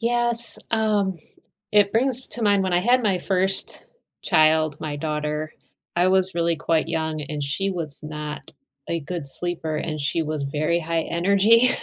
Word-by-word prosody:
Yes, 235 0 0
um, 210 -4 +1 0.5
it 205 -1 +4
brings 255 +2 0
to 240 - -4
mind 200 -2 +4
when 185 -1 -1
I 175 - +4
had 245 +6 +3
my 195 -4 +2
first 190 +1 -1 0.4
child- 155 -1 +3
my 150 -2 -4
daughter- 150 +1 -3 0.4
I 175 +1 +3
was 190 0 +2
really 170 0 +2
quite 160 +1 0
young, 160 -1 -2
and 150 0 -4
she 170 +8 -1
was 165 -6 -5
not 150 0 -6 0.4
a 170 - -1
good 160 0 -5
sleeper, 165 +1 -3
and 155 0 -3
she 150 +4 0
was 155 -2 -3
very 155 +4 0
high 165 0 -1
energy, 200 +7 +4
170 Hz, 160 wpm, -23 LUFS, 155-200 Hz, 0.5 s, it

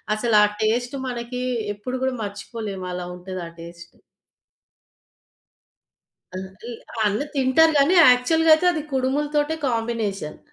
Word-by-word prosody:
అసల 230 +1 -1
ఆ - - +7 0.2
టేస్ట్ 245 +4 0
మనకి 245 0 -5 0.3
ఎప్పుడు 250 +5 -5
గూడా 265 -1 0
మర్చిపోలేము. 205 -1 -6
అలా 180 0 -5
ఉంటది 185 0 -7
ఆ - - -9
టేస్ట్. 170 +1 -11 2.4
ఆ! - - -3
అల్ 190 - -5 0.6
అన్ని 210 +8 0
తింటారు 275 +5 +4
గానీ 300 +7 +4
యాక్చువల్‌గా 315 +4 +5
అయితే 360 +3 0
అది 310 -2 -3
కుడుములతోటే 295 +4 0
కాంబినేషన్. 225 -8 -3
245 Hz, 120 wpm, -23 LUFS, 205-280 Hz, 2.4 s, ఆ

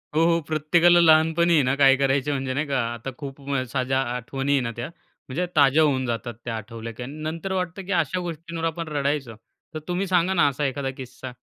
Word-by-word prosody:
हो, 160 - +4
हो. 170 0 +3
प्रत्येकाला 170 +3 +4
लहानपणी 165 +1 +4
आहे 150 -4 +4
ना, 130 +1 +1
काय 135 -1 +6
करायचे 135 +1 +1
म्हणजे 135 -2 -2
नाही 145 +4 -1
का 135 -2 0
आता 120 +3 -6
खूप 140 -2 -7 0.3
साऱ्या 130 0 0 0.2
आठवणी 135 +3 -3
आहे 140 - +3
ना 115 -2 -3
त्या. 120 +1 -4 0.4
म्हणजे 160 +8 -2
ताज्या 145 +1 +5
होऊन 135 -4 +1
जातात 120 -1 -3
त्या 120 -2 -3
आठवल्या 115 +1 -7
की 125 - -7
अन् 145 +5 -8
नंतर 165 +5 -4
वाटतं, 180 0 -3
की 195 - -5
अशा 180 0 +1
गोष्टींवर 170 -1 -6
आपण 165 0 -3
रडायचो. 140 -5 -2 0.4
तर 155 - -4
तुम्ही 180 +2 -1
सांगा 180 0 +2
ना, 175 -5 +4
असा 145 +1 -1
एखादा 135 0 -2
किस्सा. 130 0 -8
145 Hz, 210 wpm, -24 LUFS, 130-165 Hz, 0.4 s, काय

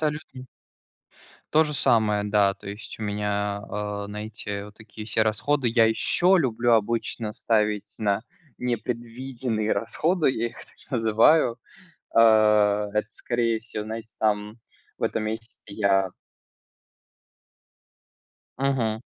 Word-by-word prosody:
Салютно. 150 -4 -4 1.1
То 160 +1 +6
же 150 - -3
самое, 110 -6 +2
да. 100 -1 +3
То 100 - -11
есть 105 +2 -8
у - - -4
меня, 105 -1 -1
а, 105 0 -3
на 105 +1 -6
эти 100 -2 -5
вот 105 0 -13
такие 110 -1 -10
все 110 0 +2
расходы 120 +5 +1
я 115 -1 +4
ещё 175 +11 +3
люблю 120 -6 +1
обычно 115 0 -1
ставить 105 -2 0
на 100 -2 +1 0.4
непредвиденные 120 -1 -3
расходы, 165 +7 +1
я 120 -2 -1
их - - -17
так - - -17
называю. 115 +3 +4 0.6
Э, - - +8 0.7
это, 105 0 0
скорее 115 -1 -1
всего, 110 -2 -6
знаете, 110 +1 -7
там 105 +1 0 0.4
в - - -10
этом 110 - -1
месяце 110 +2 -6
я 100 -2 +1 2.5
Мгм. 125 -5 0
110 Hz, 120 wpm, -25 LUFS, 105-120 Hz, 2.5 s, Э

